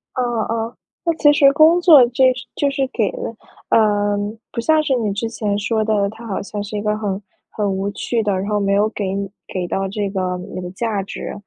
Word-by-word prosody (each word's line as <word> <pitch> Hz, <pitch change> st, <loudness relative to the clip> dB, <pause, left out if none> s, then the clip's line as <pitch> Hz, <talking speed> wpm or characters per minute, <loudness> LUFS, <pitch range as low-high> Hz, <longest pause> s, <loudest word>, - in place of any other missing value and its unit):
嗯 255 Hz, -, 0 dB, 0.3 s
嗯， 230 Hz, +1 st, -2 dB, 0.3 s
那 335 Hz, -, +2 dB
其 295 Hz, -, +6 dB
实 285 Hz, -2 st, +5 dB
工 315 Hz, +4 st, +6 dB
作 315 Hz, -8 st, +8 dB
这 255 Hz, +1 st, +4 dB, 0.2 s
就 285 Hz, -, +1 dB
是 275 Hz, -1 st, 0 dB
给 220 Hz, -6 st, 0 dB
了 -, -, -5 dB, 0.4 s
呃， 205 Hz, -2 st, +3 dB, 0.3 s
不 -, -, -4 dB
像 310 Hz, +5 st, +3 dB
是 275 Hz, -3 st, +1 dB
你 215 Hz, -4 st, -1 dB
之 225 Hz, +3 st, -2 dB
前 210 Hz, -3 st, -2 dB
说 220 Hz, +1 st, 0 dB
的， 205 Hz, -2 st, +1 dB
它 225 Hz, +2 st, -10 dB
好 200 Hz, -, -3 dB
像 205 Hz, +1 st, -5 dB
是 205 Hz, +1 st, -7 dB
一 -, -, -2 dB
个 210 Hz, 0 st, 0 dB
很 205 Hz, -2 st, -3 dB, 0.3 s
很 205 Hz, -2 st, -1 dB
无 195 Hz, +1 st, -1 dB
趣 230 Hz, +3 st, -1 dB
的， 210 Hz, -2 st, 0 dB
然 190 Hz, +1 st, -2 dB
后 210 Hz, -1 st, +1 dB
没 200 Hz, -1 st, +1 dB
有 205 Hz, +2 st, +3 dB
给 215 Hz, -2 st, -4 dB, 0.4 s
给 185 Hz, -2 st, -3 dB
到 195 Hz, +2 st, -1 dB
这 200 Hz, +1 st, -2 dB
个 185 Hz, -2 st, -2 dB, 0.2 s
你 -, -, -4 dB
的 180 Hz, -1 st, -5 dB
价 210 Hz, 0 st, -2 dB
值 195 Hz, -, -6 dB
215 Hz, 235 characters per minute, -20 LUFS, 200-240 Hz, 0.4 s, 作